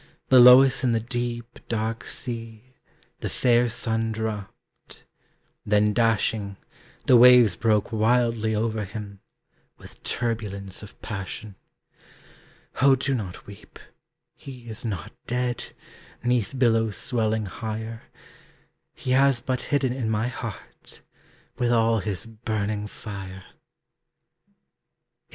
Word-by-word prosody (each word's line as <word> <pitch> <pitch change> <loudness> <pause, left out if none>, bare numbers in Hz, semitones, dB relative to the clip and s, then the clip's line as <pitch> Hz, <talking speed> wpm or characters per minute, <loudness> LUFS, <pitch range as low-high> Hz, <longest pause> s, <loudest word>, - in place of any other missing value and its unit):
Below 125 0 +9
us 135 -1 +1
in 125 -2 +2
the 115 - +2
deep, 120 0 -4
dark 115 0 -2
sea, 115 0 -6 0.5
The - - -4
fair 120 -1 +2
sun 115 -1 -1
dropped; 110 -2 -7 0.6
then 105 0 +2
dashing, 110 -3 0 0.5
The 130 - +6
waves 120 -5 +7
broke 110 +1 +1
wildly 115 0 +1
over 110 0 -1
him, 100 0 -8 0.6
With - - -14
turbulence 105 -5 -3
of 105 - -13
passion. 100 0 -6 1.3
Oh 135 0 +6
do 135 +1 -1
not 100 -8 -5
weep! 100 -1 -13 0.6
he 125 -3 -12
is 110 -2 -5
not 100 -8 -5
dead, 125 0 -2 0.5
'Neath 120 -1 0
billows 115 -4 +2
swelling 110 -3 -1
higher; 110 +2 -6 0.9
He 130 - -4
has 135 -1 +4
but 130 +1 -2
hidden 135 -3 +1
in 125 -4 -2
my 110 +2 0
heart, 115 -4 -9 0.6
With 120 -1 +1
all 115 -1 +3
his 95 -4 -4
burning 110 -2 -3
fire. 95 -3 -8
VIII. - - -34
115 Hz, 115 wpm, -25 LUFS, 105-120 Hz, 1.3 s, Below